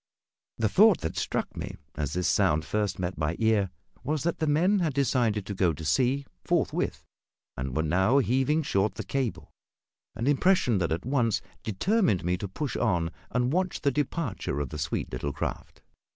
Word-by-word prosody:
The 110 - +2
thought 205 - +5
that 80 - -3
struck - - -2
me, - - -5 0.2
as 75 -1 -3
this 90 0 0
sound 80 -6 +2
first 105 +1 -1
met 90 0 -3
my 80 +2 0
ear, 110 -4 +2 0.3
was 150 -1 -1
that 170 - -1
the 155 - 0
men 175 +8 +3
had 160 -6 0
decided 120 -7 +1
to 100 - -4
go 90 -3 +2
to 80 +2 -8
sea 130 - +2 0.2
forthwith, - - 0 0.5
and 65 0 -4
were 80 - +2
now 95 - +3
heaving 135 +4 +2
short 100 -5 +1
the - - -4
cable 135 -5 -3 0.6
an 115 - -3
impression 145 - +3
that 85 -3 0
at 85 +5 -2
once 125 -5 +1 0.2
determined 140 - +1
me 90 +1 +2
to 100 - -4
push 130 +6 -4
on 90 -8 +1 0.2
and 125 +3 0
watch 185 0 0
the 140 - +2
departure 140 - -2
of 70 -3 -2
the 75 - -6
sweet 70 0 -2
little 70 +3 -3
craft. - - -5
110 Hz, 180 wpm, -28 LUFS, 90-140 Hz, 0.6 s, thought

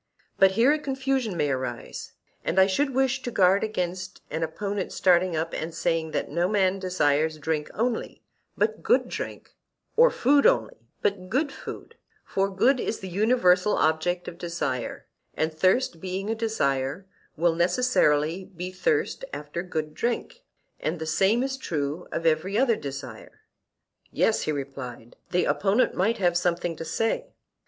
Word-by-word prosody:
But 195 0 +6
here 235 +7 +5
a 305 - +2
confusion 265 -7 -1
may 145 -3 +1
arise; 130 -2 -5 0.3
and 180 - -2
I 190 - +8
should 270 +10 +1
wish 265 0 +2
to 250 - -4
guard 195 -3 +4
against 185 -3 -3
an 160 - -2
opponent 195 +5 -3
starting 180 -1 +3
up 160 +1 -2
and 160 +1 -4
saying 165 -1 0
that - - -3
no 170 +3 +1
man 195 -2 +2
desires 155 -4 +1
drink 150 0 -2
only, 235 +1 -2 0.3
but - - 0
good 450 +2 +3
drink, - - -6 0.4
or 485 +2 +7
food 280 +3 +4
only, - - 0 0.2
but 185 -2 -1
good 280 +6 +1
food; 460 - -9 0.3
for 195 0 0
good 245 +8 +3
is 225 - -2
the 190 - -7
universal 200 -1 +3
object 165 +3 +1
of 170 - -8
desire, 170 -8 -3 0.3
and 160 0 0
thirst 185 +2 +2
being 190 +3 -3
a - - +2
desire, 145 -8 -1 0.3
will 170 +1 +3
necessarily 175 - +2
be 180 -1 -7
thirst 180 -5 0
after 150 +3 -5
good 155 -4 -4
drink; 240 - -2 0.4
and 160 +3 -2
the 160 - -5
same 195 +9 +2
is 265 0 -2
true 150 - -3
of 165 - -3
every 165 +6 +2
other 240 -2 +4
desire. 135 - -8 0.7
Yes, - - +2
he - - -1
replied, 135 -5 -6
the 180 0 +1
opponent 205 +5 +2
might 220 +6 +1
have 175 -3 +2
something 175 -1 0
to 165 - -6
say. 225 - -1
180 Hz, 160 wpm, -26 LUFS, 160-220 Hz, 0.7 s, I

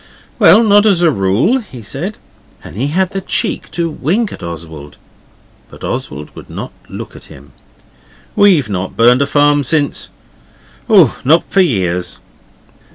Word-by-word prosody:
'Well, 230 - +6
not 205 0 +4
as 180 -4 +2
a 165 - +4
rule,' 110 - +1
he 130 - -11
said, 165 - -5 0.5
and - - -11
he 125 +7 -1
had 185 +5 0
the 195 - -4
cheek - - -2
to 170 -1 -1
wink 180 - -1
at - - -11
Oswald, 80 -3 -9 0.7
but - - -14
Oswald 75 +2 -5
would - - -12
not - - -7 0.2
look - - -8
at - - -12
him. 70 0 -15 0.8
'We've 180 - +4
not 95 -2 -4
burned 120 +3 +5
a 140 - +1
farm 145 0 +3
since 145 +2 -1 0.8
oh, 185 - +5
not 155 +6 +4
for 195 - +4
years. 90 - -1
145 Hz, 155 wpm, -15 LUFS, -, 0.8 s, Well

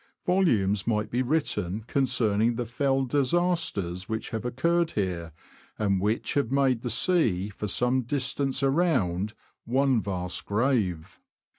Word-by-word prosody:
Volumes 110 - +2
might 105 -2 0
be 125 - +1
written 120 - -1
concerning 120 -3 +1
the 120 +1 -2
fell 135 +3 0
disasters 135 - 0
which 110 0 -3
have 115 0 -4
occurred 170 +7 +1
here, 90 -5 -2 0.5
and 100 -3 +1
which 105 +3 0
have 140 -5 0
made 135 -4 +2
the 120 - -3
sea 115 - +2
for 105 +1 -5
some 125 +6 +2
distance 135 +2 -1
around 110 - +1 0.3
one 130 0 +2
vast 90 -3 -3
grave. 105 - 0
120 Hz, 130 wpm, -27 LUFS, 100-135 Hz, 0.5 s, Volumes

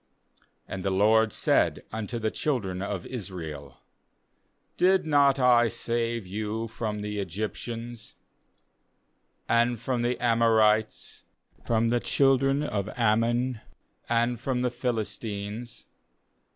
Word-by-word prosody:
uAnd 95 - -5
the 95 - -1
LORD 110 +3 +4
said - - +1
unto 110 +2 -4
the 110 -1 -1
children 100 -11 -2
of 100 -2 -4
Israel: 85 - -7 1.0
'Did 190 0 +3
not 140 -3 +4
I 120 -2 +5
save 115 -1 -2
you 110 +4 -3
from 105 -2 -4
the 105 0 -3
Egyptians, 110 +5 -5 1.3
and 120 0 +2
from 120 +1 -1
the 120 +1 0
Amorites, 110 -2 +2 0.4
from 115 0 +1
the 120 0 +1
^ - - -19
children 135 +1 +3
of 105 -7 -2
Ammon, 120 +1 +1 0.5
and 120 0 +1
from 130 0 -1
the 125 -1 0
Philistines? 115 -2 -4
115 Hz, 110 wpm, -27 LUFS, 105-120 Hz, 1.3 s, I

